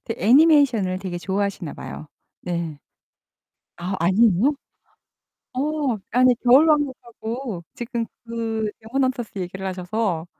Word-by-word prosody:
그 225 - -3
애니메이션을 245 - +4
되게 185 -2 -5
좋아하시나 195 -3 -2
봐요. - - -8 0.3
네. 170 -4 -4 1.0
아 180 +3 -3
아니에요? 205 - +4 1.0
어 255 - 0 0.5
아니 250 +1 +5
겨울왕국하고 255 - +2
지금 235 -1 -3 0.2
그 225 -2 -2
Demon 250 +5 0
Hunters 250 -3 -2
얘기를 190 +1 -5
하셔서 185 -2 -2
220 Hz, 300 characters per minute, -23 LUFS, 185-250 Hz, 1.0 s, 아니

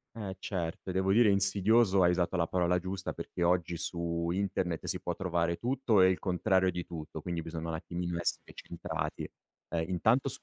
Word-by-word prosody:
Eh, 100 -4 -5
certo 90 -2 -4
e, - - -2
devo 95 +1 +1
dire, 110 +1 +6
insidioso, 100 +1 +4
hai 90 - +5
usato 90 +1 0
la 85 -2 +1
parola 90 +1 +1
giusta 95 +1 -4
perché - - -5
oggi 85 -1 +1
su 85 0 -2
internet 90 -2 -1
si - - -2
può - - -3
trovare 85 -2 0
tutto 120 -4 +2
e 95 - +6
il 95 - 0
contrario 95 0 +2
di 90 0 -4
tutto. 80 -1 -7
Quindi 85 0 -3
bisogna 80 0 -5
un 80 - -2
attimino 85 +1 -4
essere 85 - -2
centrati. - - -5 0.5
Ehm, 80 0 -1
intanto 110 +9 +2
90 Hz, 185 wpm, -31 LUFS, 85-95 Hz, 0.5 s, dire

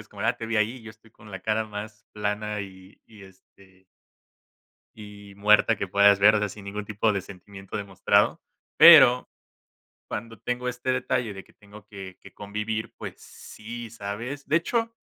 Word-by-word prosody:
es 110 - -24
como 100 0 -9
de: 115 - +1
"ah, 120 - +1
te 115 - -6
vi 115 -1 -2
ahí", 110 +4 0
y 125 - -14
yo 110 - -10
estoy 110 +1 -21
con 105 -1 -17
la 95 - -7
cara 110 0 -1
más 105 0 -9
plana 105 0 -3
y 95 -1 -12
y, 105 -3 -16
este 95 0 -21 1.1
y 100 -2 -12
muerta 105 +2 +4
que 100 - -4
puedas 100 +1 +5
ver, 105 +2 +6
o - - +3
sea, 105 0 -1
sin 100 0 -11
ningún 100 +1 -6
tipo 105 +1 0
de 100 - -2
sentimiento 95 +2 -10
demostrado. 100 -3 +1 0.4
Pero 125 +1 +8 0.8
cuando 115 0 -7
tengo 125 +4 -3
este 125 +1 -2
detalle 125 -3 -2
de 95 - -10
que - - -24
tengo 105 0 -16
que 95 -3 -10
que - - -15
convivir, 105 +2 -5
pues - - -8
sí, 115 +1 -10
¿sabes? 115 +6 -6
De 155 - +3
hecho, 230 +6 -1
105 Hz, 185 wpm, -25 LUFS, 100-115 Hz, 1.1 s, Pero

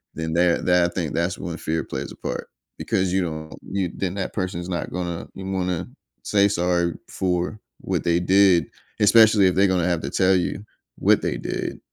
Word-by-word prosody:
then 80 0 -3
that 85 0 +2
that 90 -1 +4
I - - -21
think 85 -5 -2
that's 85 +2 -1
when 85 -1 -5
fear 80 +1 -2
plays 70 +1 -5
a - - -17
part - - -5 0.3
because 95 -1 0
you 95 - +2
don't 80 -2 -5 0.2
you 95 -3 -1
then 95 -2 -2
that 95 - -3
person's 90 -2 -3
not 85 -2 -3
gonna 85 -1 -4
wanna 95 -1 -2 0.4
say 100 -1 +3
"sorry" 85 -3 +1 0.2
for 90 +3 -1 0.2
what - - -2
they 85 0 +3
did, 95 -2 +4 0.4
especially 110 -2 +6
if 90 - +1
they're 95 +1 +4
gonna 90 -2 +1
have 85 -2 0
to - - -4
tell 95 0 +3
you 95 +3 -1 0.4
what - - +4
they - - -2
did, - - -4
90 Hz, 190 wpm, -23 LUFS, 85-95 Hz, 0.4 s, especially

